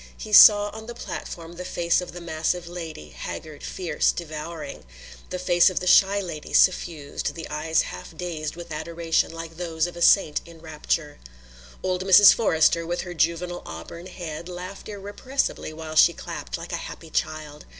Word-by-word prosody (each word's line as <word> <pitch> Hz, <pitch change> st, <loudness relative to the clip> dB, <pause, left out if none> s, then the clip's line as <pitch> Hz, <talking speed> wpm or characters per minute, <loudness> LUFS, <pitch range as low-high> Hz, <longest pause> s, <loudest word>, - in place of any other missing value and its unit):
He 215 Hz, -, -8 dB
saw 205 Hz, 0 st, +9 dB
on 220 Hz, +2 st, -10 dB
the 240 Hz, -, -7 dB
platform 170 Hz, -6 st, -7 dB
the 180 Hz, -, -5 dB
face 170 Hz, -1 st, +1 dB
of 180 Hz, -, -7 dB
the 175 Hz, -, -9 dB
massive 170 Hz, +1 st, -2 dB
lady, 165 Hz, -, -8 dB
haggard, 155 Hz, -2 st, -8 dB
fierce, 170 Hz, -5 st, 0 dB
devouring; 155 Hz, -2 st, -7 dB, 0.5 s
the 185 Hz, -, -3 dB
face 180 Hz, 0 st, +4 dB
of 185 Hz, -, -2 dB
the 180 Hz, -, -5 dB
shy 195 Hz, +2 st, +5 dB
lady, 170 Hz, -6 st, -7 dB
suffused, 165 Hz, -5 st, +1 dB
the 165 Hz, -2 st, -7 dB
eyes 160 Hz, +1 st, +1 dB
half 90 Hz, 0 st, -9 dB
dazed 165 Hz, -4 st, -4 dB
with 170 Hz, -1 st, -10 dB
adoration 165 Hz, +1 st, -1 dB
like 165 Hz, 0 st, -8 dB
those 165 Hz, -2 st, -1 dB
of 175 Hz, -, -7 dB
a 175 Hz, -, -8 dB
saint 170 Hz, -4 st, +4 dB
in 170 Hz, -1 st, -14 dB
rapture. 155 Hz, -1 st, -3 dB, 0.6 s
Old 185 Hz, 0 st, -1 dB
Mrs. 195 Hz, +1 st, +8 dB
Forrester, 165 Hz, -5 st, +3 dB
with 175 Hz, +1 st, -2 dB
her 175 Hz, -, -7 dB
juvenile 170 Hz, +2 st, -1 dB
auburn 85 Hz, -, -9 dB
head, 170 Hz, -2 st, -7 dB
laughed 180 Hz, +3 st, -8 dB
irrepressibly 205 Hz, -, -3 dB
while 155 Hz, 0 st, -8 dB
she 170 Hz, +2 st, +6 dB
clapped, -, -, -6 dB
like -, -, -8 dB
a -, -, 0 dB
happy -, -, -9 dB
child. 150 Hz, -1 st, -3 dB
170 Hz, 170 wpm, -24 LUFS, 155-180 Hz, 0.6 s, saw